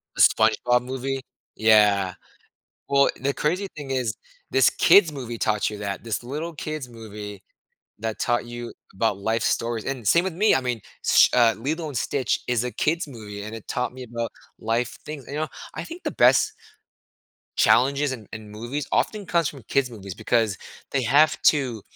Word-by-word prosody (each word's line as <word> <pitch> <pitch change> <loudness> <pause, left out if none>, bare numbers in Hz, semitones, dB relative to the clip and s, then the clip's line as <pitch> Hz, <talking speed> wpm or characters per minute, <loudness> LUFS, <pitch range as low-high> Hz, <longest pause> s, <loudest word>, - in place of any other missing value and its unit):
The - - +1
SpongeBob 115 +3 +4
movie? 130 +1 -3 0.3
Yeah. 105 -4 +4 0.8
Well, 140 0 +4
the 140 +1 0
crazy 180 +9 -1
thing 145 -3 -6
is 125 -4 -1 0.4
this - - +5
kid's 180 -6 +5
movie 125 -5 -6
taught 105 -1 +1
you 105 - -7
that. 100 -2 -4
This 115 -1 -3
little 150 +7 -5
kid's 155 -3 -5
movie 105 -4 -9 0.6
that 110 0 -4
taught 120 0 +1
you 120 0 -7 0.2
about 105 0 0
life 110 +3 0
stories 115 -2 0
and 130 -5 -4
same 170 +1 +5
with 190 -3 -3
me. 210 +5 +4
I - - +2
mean, 125 -3 -2 0.2
Sh - - +6
uh, 120 -2 +5
Lilo& 155 +5 -3
Sitch 130 +1 0
is 125 -1 +1
a 125 - -2
kid's 165 +7 0
movie, 105 -5 -8
and 105 +2 -7
it 115 - -9
taught 125 0 -1
me 130 0 -8
about 115 -1 -4 0.3
life 115 +2 -1
things 150 -3 -7
and 140 - -7
you 150 - -2
know, 155 - -1 0.3
I - - -5
think 340 +2 -9
the - - 0
best 430 - +4 1.1
challenges 140 +3 +4
in 115 -6 -7
in 110 -1 -8
movies 120 +7 -4
often 210 -2 0
comes 170 -4 +1
from 135 -5 -12
kids 135 -2 +1
movies 100 -5 -8
because 110 -5 +1 0.3
they 135 -2 +1
have 145 +6 +4
to, 130 -7 +3
125 Hz, 180 wpm, -24 LUFS, 110-140 Hz, 1.1 s, Sh